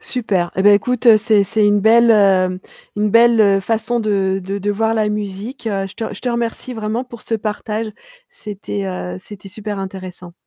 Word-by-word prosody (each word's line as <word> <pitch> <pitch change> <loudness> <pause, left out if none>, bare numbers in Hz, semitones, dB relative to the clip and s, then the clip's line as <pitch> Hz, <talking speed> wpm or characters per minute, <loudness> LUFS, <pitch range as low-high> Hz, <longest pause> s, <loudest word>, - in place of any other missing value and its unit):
Super 195 -8 -2
et 190 - +1
ben 205 - +7
écoute, 240 +1 +4
c'est 215 -1 +3
c'est 215 +1 +1
une 205 0 +3
belle, 230 +3 +5
heu, 190 -3 +3 0.4
une 210 0 +1
belle, 230 0 +5
heu, 195 -2 +4
façon 225 +3 -1
de 195 -3 0
de 195 +2 -3
de 205 +1 -2
voir 220 +2 0
la 215 -1 +1
musique. 210 +4 -5
Je 195 -3 -3
te 225 - -5
je - - -11
te 250 - -3
remercie 235 +1 -3
vraiment 220 +2 -3
pour 235 -3 -12
ce 225 - -2
partage. 215 +1 -3 0.4
C'était, 190 - -6
heu, 90 -1 -5
c'était 195 - -11
super 205 0 -6
intéressant. 185 -2 -8
210 Hz, 190 wpm, -18 LUFS, 195-225 Hz, 0.4 s, ben